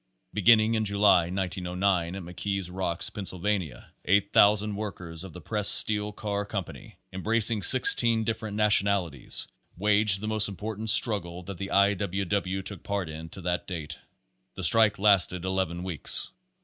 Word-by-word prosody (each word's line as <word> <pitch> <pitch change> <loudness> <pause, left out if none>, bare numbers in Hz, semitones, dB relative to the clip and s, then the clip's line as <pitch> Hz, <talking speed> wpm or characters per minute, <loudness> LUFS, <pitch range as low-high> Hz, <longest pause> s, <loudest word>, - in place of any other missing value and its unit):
Beginning 110 +2 +3
in 110 -1 -1
July, 100 -4 +2
1909, 90 -1 -3
at 95 - -8
McKees 95 +2 -5
Rocks, 90 -3 -1
Penn 100 -2 -8
sylvania, 90 -7 -4
8,000 100 +1 +2
workers 90 -5 -7
of 95 - -11
the 90 - -11
Pressed 105 +4 +6
Steel 105 -1 +2
Car 100 -1 -5
Com 100 -1 -5
pany, - - -14 0.2
embracing 110 +2 0
sixteen 115 -1 +5
different 110 -2 -5
nationalities, 100 - +1 0.3
waged 105 0 +3
the 110 - -7
most 110 -1 +1
important 110 +2 -5
struggle 90 -6 +2
that 95 -1 -10
the 95 - -6
I. 100 +1 +2
W. 100 0 -4
W. 95 0 -3
took 95 -3 -6
part 100 -4 -5
in 80 +1 -10
to 95 - -10
that 90 0 -4
date. 80 -5 -8 0.6
The 95 - -7
strike 105 +5 +3
lasted 95 -3 +2
eleven 95 -2 -3
weeks. 90 -5 -1
100 Hz, 155 wpm, -25 LUFS, 90-105 Hz, 0.6 s, Pressed